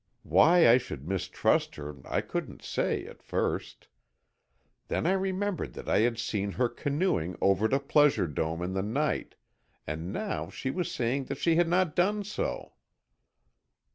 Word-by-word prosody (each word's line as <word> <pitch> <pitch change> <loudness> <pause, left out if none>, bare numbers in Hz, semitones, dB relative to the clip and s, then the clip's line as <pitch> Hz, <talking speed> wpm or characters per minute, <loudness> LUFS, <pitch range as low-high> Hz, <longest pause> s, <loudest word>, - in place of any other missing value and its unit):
Why 160 - +6
I 120 +2 +7
should 70 - -8
mistrust 90 -1 0
her 75 -1 -7
I - - 0
couldn't - - -5
say, - - -1
at - - -12
first. - - -3 1.0
Then - - -1
I 175 - +3
remembered 190 0 -1
that - - -9
I - - +3
had 115 +1 +2
seen 100 -3 -2
her 125 -1 +1
canoeing 140 - -1
over 100 +2 +3
to 135 +5 +2
Pleasure 145 -5 +3
Dome 80 +2 -2
in 90 +1 -3
the 95 - 0
night, 140 +9 -1 0.5
and 80 +4 -4
now 210 - -3
she 130 - -4
was 180 +3 -2
saying 130 +3 -1
she 165 +4 +2
had 175 0 +4
not 175 -2 +1
done 205 +4 +2
so. 210 - -4
125 Hz, 155 wpm, -29 LUFS, -, 1.0 s, I